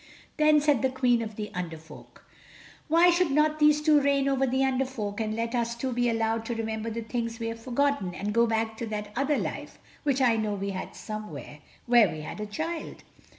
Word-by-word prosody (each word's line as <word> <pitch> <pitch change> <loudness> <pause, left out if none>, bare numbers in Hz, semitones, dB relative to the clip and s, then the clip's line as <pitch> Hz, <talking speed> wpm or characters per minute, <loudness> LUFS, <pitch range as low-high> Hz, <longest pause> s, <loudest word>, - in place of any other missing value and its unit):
Then 305 -1 +5
said 290 -5 +2
the 265 - +2
Queen 250 -2 +2
of 220 -2 -5
the 210 0 -5
Under 175 -3 -4
Folk: 160 +1 -15 0.6
"Why 340 +3 +5
should 345 -1 +2
not 305 +2 +2
these 300 0 +4
two 300 -2 +5
reign 280 -1 +2
over 270 -1 +2
the 260 +1 +1
Under 265 0 +1
Folk 220 -5 -4
and 215 0 -2
let 230 +1 -2
us 235 -1 -1
two 255 +2 -3
be 245 0 +1
allowed 225 0 0
to 235 - -3
remember 220 0 -3
the 230 +1 -4
things 230 0 -3
we 230 0 -2
have 230 0 -6
forgotten 255 -6 0
and 205 +2 -3
go 235 +1 +4
back 225 0 -1
to 230 - -4
that 210 -1 -5
other 275 +3 +1
life - - -5 0.2
which 280 -3 +1
I 240 -4 +4
know 215 -2 -1
we 200 0 -3
had 185 - -6
somewhere—where 215 +3 -1
we 155 - -6
had 155 - -7
a 210 - -4
child." 320 +10 -5
235 Hz, 215 wpm, -27 LUFS, 215-275 Hz, 0.6 s, Then